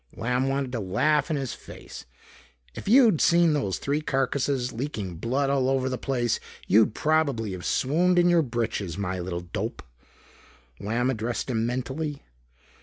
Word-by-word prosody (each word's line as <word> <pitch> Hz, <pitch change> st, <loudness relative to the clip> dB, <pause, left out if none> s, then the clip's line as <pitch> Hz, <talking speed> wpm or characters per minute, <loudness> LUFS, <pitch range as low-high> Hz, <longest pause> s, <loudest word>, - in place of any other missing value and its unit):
Lamb 125 Hz, +3 st, 0 dB
wanted 135 Hz, -1 st, -1 dB
to 120 Hz, -, -2 dB
laugh 130 Hz, -, +1 dB
in 155 Hz, -, 0 dB
his 135 Hz, -4 st, -3 dB
face. -, -, -11 dB, 0.7 s
"If -, -, -9 dB
you'd 225 Hz, -, +6 dB
seen 170 Hz, -2 st, +4 dB
those 100 Hz, -11 st, -1 dB
three 145 Hz, +2 st, -1 dB
carcasses 135 Hz, -2 st, 0 dB
leaking 110 Hz, -, -4 dB
blood 135 Hz, -, 0 dB
all 135 Hz, -2 st, +2 dB
over 135 Hz, -1 st, +1 dB
the 130 Hz, -, -2 dB
place, 120 Hz, -4 st, 0 dB, 0.3 s
you'd 110 Hz, +2 st, +4 dB
probably 140 Hz, -9 st, +1 dB
have 90 Hz, -1 st, -6 dB
swooned 175 Hz, +7 st, +2 dB
in 175 Hz, 0 st, +5 dB
your 175 Hz, -1 st, +5 dB
britches, 115 Hz, -, -2 dB
my 95 Hz, -2 st, -2 dB
little 85 Hz, -1 st, -4 dB
dope," 85 Hz, -, -5 dB, 1.0 s
Lamb 115 Hz, +6 st, 0 dB
addressed 120 Hz, +2 st, -3 dB
him 115 Hz, -1 st, 0 dB
mentally. 135 Hz, +4 st, -3 dB
130 Hz, 155 wpm, -26 LUFS, 110-145 Hz, 1.0 s, you'd